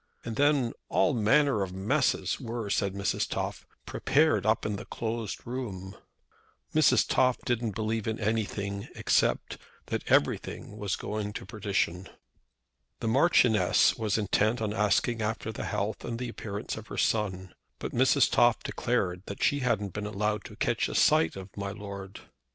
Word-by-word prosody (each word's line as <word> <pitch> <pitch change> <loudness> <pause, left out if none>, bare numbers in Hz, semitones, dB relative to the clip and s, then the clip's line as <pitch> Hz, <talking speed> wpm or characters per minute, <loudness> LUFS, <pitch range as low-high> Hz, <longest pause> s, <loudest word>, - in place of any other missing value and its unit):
"And 115 -1 -4
then 140 -3 +2 0.2
all 150 - +3
manner 120 +1 +3
of 95 -2 -3
messes 95 +3 0
were," 115 -3 -4
said 100 -1 0
Mrs. 100 0 -1
Toff, - - -4 0.2
"prepared 150 -6 +2
up 110 0 +2
in 105 -1 -1
the 110 - -8
closed 115 -2 -4
room." 100 -6 -5 0.8
Mrs. - - +4
Toff 125 -1 +3
didn't 115 -4 -1
believe 110 0 -2
in 110 0 -2
anything, 100 -2 -2
except - - +1 0.3
that - - -2
everything 105 - +1
was 105 -3 -2
going 105 -1 -4
to - - -6
perdition. 95 -3 -2 0.9
The 115 - -1
Marchioness 125 -4 +4
was 110 -2 0
intent 110 +2 +1
on 105 -2 -1
asking 110 +2 +1
after 110 0 -2
the - - -5
health 100 +1 -2
and 115 0 -4
appearance 110 -5 -5
of 110 -1 -9
her - - -7
son, 95 -4 0 0.2
but - - -5
Mrs. 130 +3 +4
Toff 120 -1 +4
declared 95 -7 -1
that 100 - -5
she 145 - +3
hadn't 110 -7 0
been 105 0 -4
allowed 105 0 -1
to - - -10
catch - - 0
a - - -5
sight 80 - +4
of 95 0 -9
"my 100 -1 -3
lord." 100 -1 -8
110 Hz, 155 wpm, -29 LUFS, 100-115 Hz, 0.9 s, Mrs